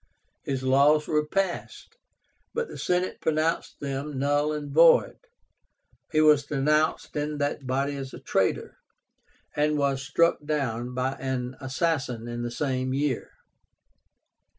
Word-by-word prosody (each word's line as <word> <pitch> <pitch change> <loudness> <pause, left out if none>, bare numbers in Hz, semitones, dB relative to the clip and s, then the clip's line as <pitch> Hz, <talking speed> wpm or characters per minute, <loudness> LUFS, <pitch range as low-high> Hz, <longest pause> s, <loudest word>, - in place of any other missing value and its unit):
His 135 -1 -3
laws 140 +3 +4
were 150 -1 +1
passed, 190 +1 -3 0.6
but 470 0 -1
the - - -9
Senate 180 +1 -1
pronounced 160 +1 -1
them 140 +1 -4
null 145 +2 +1
and 145 -2 -5
void. 165 +2 +5 0.9
He 155 -2 +3
was 150 -2 +5
denounced 150 +2 +1
in 150 0 -2
that 145 -1 -2
body 140 +2 0
as 135 -1 -6
a - - -9
traitor, - - -1 0.8
and 150 0 +1
was 140 -2 0
struck 170 +3 +2
down 125 -5 -2
by 130 +1 0
an 130 -1 -3
assassin 130 -4 -1
in 120 0 -4
the 120 - -2
same 130 0 -2
year. 140 -2 -1
145 Hz, 130 wpm, -26 LUFS, 130-150 Hz, 0.9 s, void